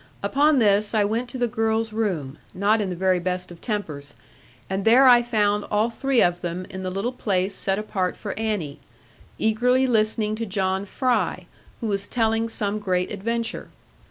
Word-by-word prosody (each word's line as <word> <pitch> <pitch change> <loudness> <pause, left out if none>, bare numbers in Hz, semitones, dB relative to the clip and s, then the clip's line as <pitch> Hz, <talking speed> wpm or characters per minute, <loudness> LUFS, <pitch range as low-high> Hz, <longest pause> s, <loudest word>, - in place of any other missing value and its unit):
Upon 290 +1 +3
this, 210 -1 +3
I 210 - +4
went 230 +4 -2
to 260 - -6
the 245 -1 +1
girls' 225 -1 -1
room, 170 -11 -2 0.2
not 210 +4 +2
in 200 - -2
the 180 - -3
very 185 0 +2
best 180 0 -3
of 170 - -12
tempers, 160 - -4 0.5
and 190 +1 -2
there 250 +5 +6
I 245 -1 +8
found 210 -3 +1
all 215 +2 0
three 265 +1 +2
of 175 0 +1
them 175 +1 -4
in 190 - -6
the 185 - -3
little 195 +6 -2
place 195 -5 -1
set 195 0 -1
apart 190 -4 -2
for 205 - -5
Annie, 210 -10 -3 0.6
eagerly 250 +4 +2
listening 215 -3 +1
to 230 - -3
John 190 0 -1
Fry, 215 -7 0 0.4
who - - -3
was 200 -1 -1
telling 225 -1 0
some 210 -1 -2
great 180 -3 -1
adventure. 230 +3 -3
210 Hz, 180 wpm, -24 LUFS, 190-225 Hz, 0.6 s, I